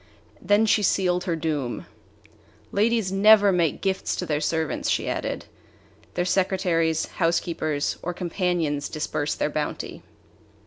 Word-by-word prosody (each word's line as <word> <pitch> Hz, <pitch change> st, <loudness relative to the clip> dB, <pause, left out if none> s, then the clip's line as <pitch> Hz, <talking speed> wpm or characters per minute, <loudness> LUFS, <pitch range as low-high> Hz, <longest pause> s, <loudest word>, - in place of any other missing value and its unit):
Then 205 Hz, +2 st, +3 dB
she 215 Hz, 0 st, +3 dB
sealed 180 Hz, -2 st, +1 dB
her 175 Hz, -3 st, 0 dB
doom. 150 Hz, -6 st, -3 dB, 0.9 s
"Ladies 215 Hz, -1 st, +1 dB
never 205 Hz, +1 st, +6 dB
make 170 Hz, -5 st, +1 dB
gifts 190 Hz, -1 st, -1 dB
to 180 Hz, -, -3 dB
their 150 Hz, -3 st, -1 dB
servants," 160 Hz, 0 st, -1 dB
she -, -, 0 dB
added. -, -, -3 dB, 0.7 s
"Their 175 Hz, -, 0 dB
secretaries, 180 Hz, -4 st, +1 dB
housekeepers, 165 Hz, -3 st, -1 dB
or 180 Hz, -, -3 dB
companions 175 Hz, -4 st, -1 dB
disburse 150 Hz, -1 st, -2 dB
their 150 Hz, -, -1 dB
bounty." 150 Hz, 0 st, -4 dB
175 Hz, 125 wpm, -25 LUFS, 155-190 Hz, 0.9 s, never